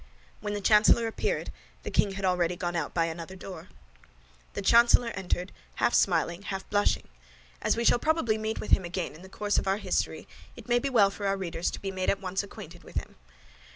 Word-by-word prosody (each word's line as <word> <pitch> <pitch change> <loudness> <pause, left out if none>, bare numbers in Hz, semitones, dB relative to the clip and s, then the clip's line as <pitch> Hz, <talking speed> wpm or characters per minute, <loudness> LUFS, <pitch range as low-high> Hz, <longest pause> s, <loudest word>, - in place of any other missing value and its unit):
When 205 0 -3
the 205 - -3
chancellor 215 +3 +5
appeared, 225 - -2 0.3
the - - -5
king 200 - +2
had 195 0 -3
already 180 -1 +1
gone 175 0 -3
out 165 -4 -2
by 165 -1 +1
another 165 +2 -6
door. 180 -3 -9 0.9
The - - -4
chancellor 235 0 +5
entered, 180 -1 -3 0.2
half - - +1
smiling, 170 0 +2
half 195 -1 -5
blushing. 205 0 +1 0.5
As - - +1
we 235 - 0
shall 240 - +5
probably 275 -9 +1
meet 220 +1 -2
with - - -6
him 190 - +5
again 175 0 -4
in 155 - -13
the 190 - -12
course 205 +1 0
of - - -4
our 195 +1 +2
history, - - -2 0.3
it - - -12
may 240 0 +3
be 275 - -2
well 210 -6 +4
for 200 0 -4
our 195 0 +1
readers 175 -2 -2
to - - -6
be 195 - -4
made 185 -1 -1
at 195 - +1
once 190 -1 -2
acquainted 200 - -11
with - - -14
him. - - -4
195 Hz, 215 wpm, -28 LUFS, 180-215 Hz, 0.9 s, chancellor